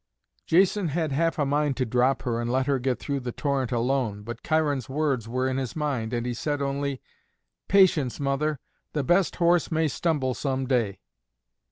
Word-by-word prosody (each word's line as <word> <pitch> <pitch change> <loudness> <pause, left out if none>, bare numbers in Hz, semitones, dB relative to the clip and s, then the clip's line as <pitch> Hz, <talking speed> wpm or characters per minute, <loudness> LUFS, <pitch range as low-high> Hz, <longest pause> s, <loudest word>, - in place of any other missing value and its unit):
Jason 190 +2 +3
had 160 0 -1
half 165 +4 +1
a 145 - +1
mind 145 -1 0
to 130 - +1
drop 125 +3 +1
her 120 -1 -1
and 120 0 -2
let 130 +1 +1
her 140 -1 +1
get 125 -1 0
through 140 -1 -3
the 125 -1 -4
torrent 135 -2 -1
alone, 120 -4 0
but 115 +2 -7
Cheiron's 145 -6 0
words 135 -5 -1
were 130 +2 0
in 130 0 -1
his 130 -3 -3
mind, 140 -8 -2
and 120 -1 -2
he 125 - -1
said 145 +5 -2
only, 140 -1 -2 0.7
"Patience, 175 -10 +4
mother, 140 +2 0 0.3
the 150 - 0
best 175 +7 +2
horse 170 -1 +2
may 160 0 +2
stumble 145 -4 0
some 135 +2 -2
day." 120 -7 0
135 Hz, 185 wpm, -26 LUFS, 125-150 Hz, 0.7 s, Patience